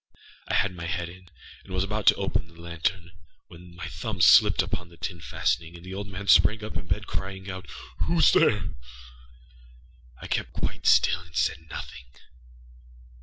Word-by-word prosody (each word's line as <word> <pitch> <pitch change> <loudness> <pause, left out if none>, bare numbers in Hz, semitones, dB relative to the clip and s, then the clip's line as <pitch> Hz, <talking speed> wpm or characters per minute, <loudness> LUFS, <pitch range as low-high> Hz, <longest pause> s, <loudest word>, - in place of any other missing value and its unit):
I - - 0
had 100 -1 +2
my 85 -1 -6
head 85 0 -2
in, 90 0 -15 0.3
and 95 - -15
was 95 - +1
about 105 +1 -3
to - - +8
open - - -2
the 85 0 -19
lantern, 85 +1 -3 0.4
when 85 +1 -14
my 85 -1 -6
thumb 95 +4 -5
slipped 85 - +7
upon 90 -1 -5
the 85 - -17
tin 85 -2 -5
fastening, 80 +1 -1
and 85 +1 -12
the 95 - -7
old 100 +1 -5
man 100 +1 -7
sprang 105 +3 +5
up 110 - -6
in 95 - -4
bed, 105 +2 -1
crying 95 -1 -5
outââWhoâs 95 - 0
there?â 105 -4 +3 1.5
I - - -9
kept - - -2
quite - - -3
still 85 - +5
and 85 -1 -16
said 80 0 -1
nothing. 65 - -8
90 Hz, 170 wpm, -26 LUFS, 85-95 Hz, 1.5 s, to